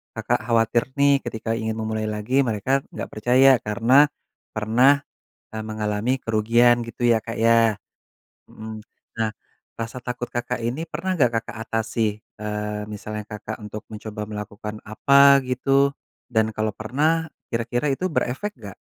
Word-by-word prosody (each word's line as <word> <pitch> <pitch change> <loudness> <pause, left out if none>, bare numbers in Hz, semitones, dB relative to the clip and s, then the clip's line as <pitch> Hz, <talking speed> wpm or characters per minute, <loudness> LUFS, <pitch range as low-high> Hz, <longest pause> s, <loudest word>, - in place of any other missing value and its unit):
Kakak - - 0
khawatir 115 0 +2 0.2
nih 140 0 +5
ketika 115 -1 -3
ingin 110 -1 -2
memulai 110 0 -2
lagi 110 +6 +1
mereka 125 +5 0
nggak - - -5
percaya 125 +5 +5
karena 115 +7 +5 0.5
pernah, 125 +6 +4 0.5
eee, 110 - -3
mengalami 110 +3 -1
kerugian 120 +2 +3
gitu 115 +1 -6
ya 115 -1 +4
Kak 115 - -6
ya 115 -2 +4 0.7
mhm, 110 0 -8 0.4
nah 110 -1 +1 0.5
rasa 115 +2 -5
takut 125 0 -4
Kakak 120 0 -3
ini 125 +8 -2
pernah 190 +3 -2
gak 125 -3 +5
Kakak 120 +1 -10
atasi, 110 -1 -1 0.2
eee, 105 0 -3
misalnya 105 0 -6
Kakak 105 0 -6
untuk 105 0 -7
mencoba 105 0 -6
melakukan 105 0 -6
apa 140 +5 +6
gitu 135 +2 +3 0.4
dan 110 -2 +1
kalau 110 0 0
pernah 155 +9 0 0.2
kira-kira 120 +4 -1
itu 180 - -2
berefek 150 +10 -1
gak? 100 -3 -9
115 Hz, 140 wpm, -23 LUFS, 110-125 Hz, 0.7 s, apa